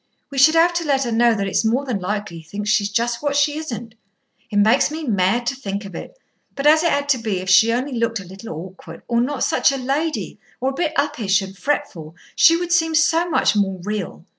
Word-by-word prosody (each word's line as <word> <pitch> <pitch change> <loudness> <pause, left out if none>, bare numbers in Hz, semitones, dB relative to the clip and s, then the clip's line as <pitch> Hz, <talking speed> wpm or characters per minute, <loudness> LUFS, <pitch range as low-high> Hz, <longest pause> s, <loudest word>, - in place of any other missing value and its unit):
We 275 - -3
should 315 +4 +6
have 340 +2 +4
to 340 0 -1
let 275 -3 +1
her 240 - -3
know 230 0 +3
that 200 -2 -2
it's 195 - 0
more 240 +5 0
than 245 -7 -2
likely 205 -1 -4
he - - -14
thinks 205 +6 -4
she's 205 -1 +1
just 235 +2 -1
what 290 -1 -1
she 290 +1 +2
isn't. 235 -7 -7 0.6
It 210 - -7
makes 215 +6 +4
me 315 +2 -6
mad 215 -1 +1
to 260 +3 -1
think 200 -5 -5
of 195 - -10
it. - - -9 0.4
But 275 - -4
as 310 +1 +6
it 335 -1 +1
had 285 0 0
to 265 -3 +3
be, 215 -4 -2
if 185 0 -2
she 225 +5 +6
only 255 +4 -2
looked 230 -2 -1
a - - -8
little 190 +5 -11
awkward, 165 0 -9
or 235 -1 +1
not 270 +2 -2
such - - +2
a 275 - -3
lady, 285 +5 -3 0.2
or 265 +1 -1
a - - -8
bit 315 +2 -2
uppish 205 -8 +1
and 190 0 -9
fretful, 185 - -3 0.2
she 330 - +6
would 350 0 -4
seem 325 -2 +2
so 330 +2 +2
much 300 - +2
more 195 -2 0
real. 205 -4 -5
235 Hz, 240 wpm, -20 LUFS, 200-290 Hz, 0.6 s, should